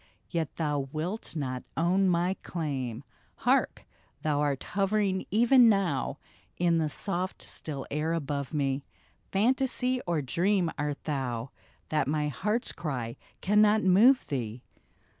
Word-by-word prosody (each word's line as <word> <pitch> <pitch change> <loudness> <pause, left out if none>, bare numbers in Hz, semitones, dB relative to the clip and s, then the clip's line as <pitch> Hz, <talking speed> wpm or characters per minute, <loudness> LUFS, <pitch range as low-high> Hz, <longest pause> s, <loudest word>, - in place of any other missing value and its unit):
Yet 165 -4 -2
thou 145 -4 -1
wilt 170 +7 -4
not 130 -4 -2 0.2
own 185 +3 +3
my 175 +1 +2
claim. 135 -9 -3 0.3
Hark! - - +1 0.4
thou'rt 145 -3 0
hovering 195 -1 0
even 240 +3 +6
now 185 - +1 0.4
In 170 -1 +3
the 155 -1 0
soft 185 +3 -3
still 140 -4 -6
air 155 +3 0
above 140 -4 -2
me 140 -2 0 0.2
— - - -37
Fantasy 255 +3 +2
or 165 -4 0
dream 175 +5 +1
art 145 0 -3
thou, 130 -4 -3 0.4
That 150 -3 +1
my 150 0 0
heart's 210 - -1
cry 125 -8 -4 0.3
cannot 210 +2 +4
move 220 +9 +6
thee 120 -3 -4
165 Hz, 125 wpm, -29 LUFS, 140-195 Hz, 0.4 s, even